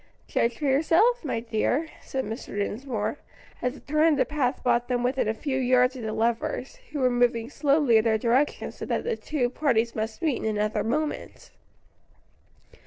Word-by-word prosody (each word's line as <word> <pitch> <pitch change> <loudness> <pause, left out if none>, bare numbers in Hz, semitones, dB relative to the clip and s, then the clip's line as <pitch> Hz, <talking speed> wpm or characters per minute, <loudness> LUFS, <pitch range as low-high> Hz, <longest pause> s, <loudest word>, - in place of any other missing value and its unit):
"Judge 235 0 0
for 295 - -4
yourself, 330 - +3
my 265 -6 -1
dear," 240 +7 0
said 265 -1 -3
Mr. 220 -2 -6
Dinsmore, 220 +3 -2 0.4
as 250 +2 -1
a - - -12
turn 305 +3 +2
in 315 - +4
the 260 -2 +2
path 275 -1 -1
brought 240 -1 +2
them 245 -1 0
within 255 -1 +1
a 220 - +1
few 265 +2 -2
yards 250 0 +3
of 255 - -7
the 220 -1 -3
lovers, 230 - -1
who - - -5
were 255 -1 +3
moving 240 0 +1
slowly 280 -6 +3
in 220 - +3
their 220 -1 +3
direction 245 +6 +1
so - - -10
that - - -1
the 470 -1 -1
two 295 - -1
parties 240 -3 0
must 220 +8 -4
meet 300 -6 +1
in 215 -1 -1
another 210 +1 0
moment. 300 +7 -3
250 Hz, 185 wpm, -26 LUFS, 230-290 Hz, 0.4 s, in